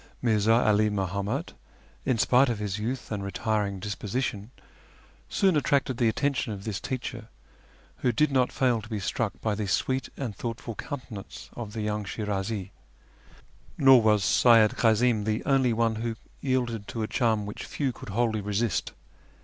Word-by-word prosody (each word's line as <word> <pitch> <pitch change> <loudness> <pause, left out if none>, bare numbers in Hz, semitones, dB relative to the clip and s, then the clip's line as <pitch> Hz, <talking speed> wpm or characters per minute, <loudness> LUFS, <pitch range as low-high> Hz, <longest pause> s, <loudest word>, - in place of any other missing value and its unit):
Mi'rza 110 -2 +3
'All 105 0 +4
Muhammad, 100 - -2 0.5
in 125 - +2
spite 125 +4 +4
of 115 - -1
his 105 -1 -3
youth 120 +4 -4
and 100 -2 -2
retiring 100 0 -1
dis 100 +1 -3
position, 105 0 -3 0.8
soon 190 -4 +2
attracted 140 -3 +1
the 120 - +3
attention 140 0 0
of 100 -2 -6
this 105 -3 -3
teacher, 120 -3 -5 0.7
who 120 - +1
did 150 +6 +2
not 130 -2 +2
fail 125 -4 +1
to 110 - -12
be 110 -3 -2
struck 95 - -2
by 110 - 0
the 105 0 -3
sweet 130 +7 0
and 120 -7 -4
thoughtful 115 0 -5
countenance 120 -5 -8
of 110 -4 -6
the 110 - -3
young 105 0 -1
Shirazi. 100 -1 -3 1.1
Nor 135 -3 +7
was 105 -2 +3
Seyyid 110 +3 +5
Kazim 115 -1 +3
the 110 +1 -1
only 135 -3 +3
one 115 -1 +1
who 115 0 -2 0.2
yielded 120 -6 -1
to 115 - -3
a - - -2
charm 110 -5 +1
which 105 - -6
few 135 -4 -2
could - - -10
wholly 110 +1 0
resist. 105 -2 -1
110 Hz, 165 wpm, -27 LUFS, 105-125 Hz, 1.1 s, Nor